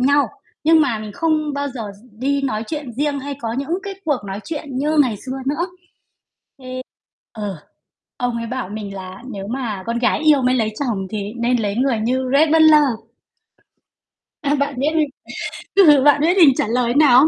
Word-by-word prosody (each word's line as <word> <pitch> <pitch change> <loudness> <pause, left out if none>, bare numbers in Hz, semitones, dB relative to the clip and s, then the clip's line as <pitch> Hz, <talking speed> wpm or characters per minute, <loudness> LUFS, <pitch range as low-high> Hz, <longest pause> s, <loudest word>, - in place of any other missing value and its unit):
nhau, 285 +3 +4 0.4
nhưng 320 +1 +6
mà 250 -7 +1
mình 215 -1 -7
không 310 +3 0
bao 285 0 -2
giờ 250 -4 -6 0.2
gi 250 - -20
đi 280 +2 0
nói 220 -5 -1
chuyện 295 -4 -5
riêng 285 +3 -1
hay 285 +1 -5
có 225 -1 -3
những 280 +8 -2
cái 400 0 -5
cuộc 295 -5 +1
nói 195 +1 -5
chuyện 290 -4 -5
như 300 +3 +1
ngày 250 -7 +3
xưa 260 +1 -3
nữa. 300 +6 0 1.7
Thế - - -5
ờ, 200 -2 -3 0.6
ông 245 -2 -1
ấy 230 0 -4
bảo 250 -4 -4
mình 205 -1 -6
là 185 0 -8
"Nếu 195 -3 -6
mà 225 -5 -3
con 235 +1 -1
gái 245 - +2
yêu 305 -3 +4
mới 255 0 +2
lấy 220 -3 0
chồng 220 -9 -2
thì 210 0 -4
nên 245 +1 +2
lấy 205 -1 -1
người 250 -2 +1
như 255 +3 0
Rhett 300 +2 +4
Butler." 315 -2 +7 1.6
À, 290 0 +1
bạn 280 0 -1
biết 275 - +1
mình 310 -2 +3 0.7
ừ, 300 -9 +7
bạn 290 0 +5
biết 345 +5 +3
mình 300 -8 +7
trả - - 0
lời 240 +1 +1
nào 280 -4 +7
không? 290 - +6
265 Hz, 200 wpm, -20 LUFS, 230-295 Hz, 1.7 s, Butler